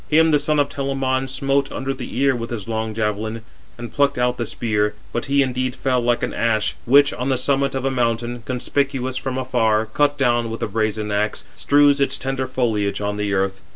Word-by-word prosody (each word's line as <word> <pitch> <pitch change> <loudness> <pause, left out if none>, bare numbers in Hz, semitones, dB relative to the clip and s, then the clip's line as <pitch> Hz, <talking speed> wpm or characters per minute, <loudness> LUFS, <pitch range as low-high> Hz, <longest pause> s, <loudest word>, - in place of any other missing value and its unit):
Him 160 +1 +5
the 150 - +4
son 150 +1 +1
of 145 - +3
Telamon 135 -2 -1
smote 135 +1 0
under 135 +1 -3
the 130 -2 -7
ear 135 0 +3
with 115 -1 -5
his 115 -5 -5
long 110 -1 -3
javelin, 110 +1 -2 0.3
and 120 -1 -8
plucked 140 -1 +2
out 125 0 +1
the 120 - -2
spear; 105 -2 -1 0.2
but 120 - -2
he 140 0 +3
indeed 130 -1 -2
fell, 130 -2 0
like 120 0 +1
an - - -2
ash, 110 -2 0
which, 140 +3 +5
on 125 +2 -3
the 130 - +2
summit 140 +1 +1
of 135 0 -2
a 135 - +1
mountain 120 -1 -1
conspicuous 130 +1 -2
from 130 0 -3
afar, 115 -4 +1
cut 145 +6 +1
down 120 -4 +1
with 115 - -5
a - - 0
brazen 110 0 -1
axe, 105 +1 -1
strews 145 0 +4
its 140 - +1
tender 135 -1 -2
foliage 110 -6 0
on 105 0 -2
the 105 -1 -1
earth. 95 0 -1
125 Hz, 210 wpm, -21 LUFS, 110-135 Hz, 0.3 s, Him